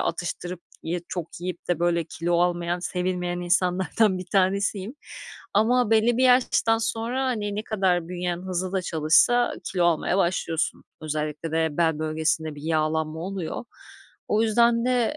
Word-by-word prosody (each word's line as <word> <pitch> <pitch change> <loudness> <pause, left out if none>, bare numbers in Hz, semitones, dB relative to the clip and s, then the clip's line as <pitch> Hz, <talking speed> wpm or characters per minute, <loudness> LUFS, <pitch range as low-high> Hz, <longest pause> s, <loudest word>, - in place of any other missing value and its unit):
atıştırıp 175 +1 -3 0.2
ye 175 +2 -2
çok 175 -3 -5
yiyip 180 0 -6
de 175 -3 +1
böyle 170 -1 +1
kilo 170 +2 -1
almayan, 175 0 0
sevilmeyen 180 -1 -2
insanlardan 185 +2 +1
bir 180 - -7
tanesiyim. 195 +3 0 0.6
Ama 230 +2 +3
belli 225 +1 +4
bir 255 - +2
yaştan 245 -2 +4
sonra, 230 +4 -1
hani, 210 -5 -2
ne 210 - -2
kadar 185 -6 0
bünyen 180 -1 -2
hızlı 185 0 -3
da 190 -1 0
çalışsa 170 +10 +3 0.2
kilo 180 -2 +1
almaya 175 +2 +1
başlıyorsun. 170 -3 -1 0.2
Özellikle 155 +1 -3
de 160 0 +2
bel 160 -2 +2
bölgesinde 155 0 -1
bir 145 - -11
yağlanma 155 0 -1
oluyor. 185 +2 -4 0.6
O 215 +1 +2
yüzden 235 +1 +3
de 250 +3 +1
180 Hz, 145 wpm, -25 LUFS, 165-210 Hz, 0.6 s, belli